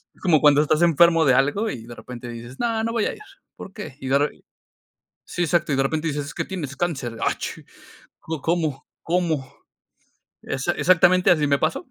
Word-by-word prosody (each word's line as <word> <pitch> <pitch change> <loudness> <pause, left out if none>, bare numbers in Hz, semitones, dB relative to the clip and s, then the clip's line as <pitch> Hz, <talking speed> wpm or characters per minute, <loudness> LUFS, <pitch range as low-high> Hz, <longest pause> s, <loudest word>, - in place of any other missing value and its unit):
Es - - -25
como 165 -6 +4
cuando 145 -1 +6
estás 155 +1 +1
enfermo 170 0 +5
de 135 - +5
algo 145 - +1
y 115 - -6
de 120 - -9
repente 120 0 -9
dices: 120 +2 -9
"No, 230 -2 0
no 230 - -2
voy 230 -3 +1
a - - -1
ir, - - -13 0.4
¿por 195 - -10
qué?". 200 -11 -8
Y 135 - -7
de 135 +1 +3
re 145 +1 -2 0.8
sí, 175 - -2
exacto, 170 -2 +1
y - - +2
de 135 - +2
repente 155 +3 -1
dices: 145 -2 -2
"Es 145 - -8
que - - -3
tienes 155 -8 -5
cáncer". 135 -9 -3
"Achi. - - -4 0.6
¿Có 160 -3 -6
cómo? 160 -4 -1 0.2
¿Cómo?". 165 -6 -1 0.9
Exa 135 +6 -2
exactamente 180 0 +4
así 155 -4 +3
me 140 0 +3
pasó, 160 - -1
155 Hz, 200 wpm, -23 LUFS, 135-175 Hz, 0.9 s, cuando